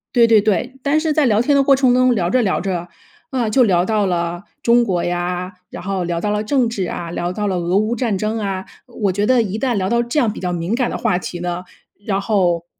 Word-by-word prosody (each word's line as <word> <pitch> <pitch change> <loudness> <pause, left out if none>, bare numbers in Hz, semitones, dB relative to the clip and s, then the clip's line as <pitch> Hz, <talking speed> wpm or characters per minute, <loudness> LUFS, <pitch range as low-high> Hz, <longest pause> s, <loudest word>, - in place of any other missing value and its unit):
对 235 -1 +6
对 225 -2 +5
对。 215 +5 0
但 285 +3 +2
是 315 -1 0
在 305 -1 +3
聊 220 -3 +3
天 285 +4 +2
的 280 - +4
过 275 0 +5
程 260 -2 +3
中 255 0 +4
聊 175 -5 0
着 255 +7 +2
聊 200 -5 0
着， 180 -3 -3 0.4
啊， 250 -6 -1
就 255 +4 +4
聊 180 -5 +2
到 215 0 +1
了 175 -1 -2 0.2
中 240 +1 +4
国 185 -6 -1
呀， 175 +1 -2 0.2
然 - - -8
后 190 -1 -2
聊 170 -1 -2
到 205 +4 -1
了 210 0 -1
政 255 +2 +1
治 200 -5 -2
啊， 170 -1 -5
聊 175 +1 -2
到 210 +2 -2
了 190 - -1
俄 175 +2 0
乌 215 +3 +1
战 230 -4 -1
争 215 +3 -2
啊， 195 -2 -3 0.2
我 215 -5 -1
觉 205 +3 0
得 255 +1 +4
一 210 +1 -4
旦 250 -1 0
聊 190 -2 -1
到 235 +1 +2
这 240 +5 -1
样 235 -6 +2
比 - - -8
较 180 -1 -2
敏 175 +3 -2
感 245 0 0
的 - - -3
话 180 - +1
题 180 -1 -6
呢， 175 0 -3 0.4
然 195 -2 0
后 180 -5 +1
205 Hz, 275 characters per minute, -19 LUFS, 180-240 Hz, 0.4 s, 对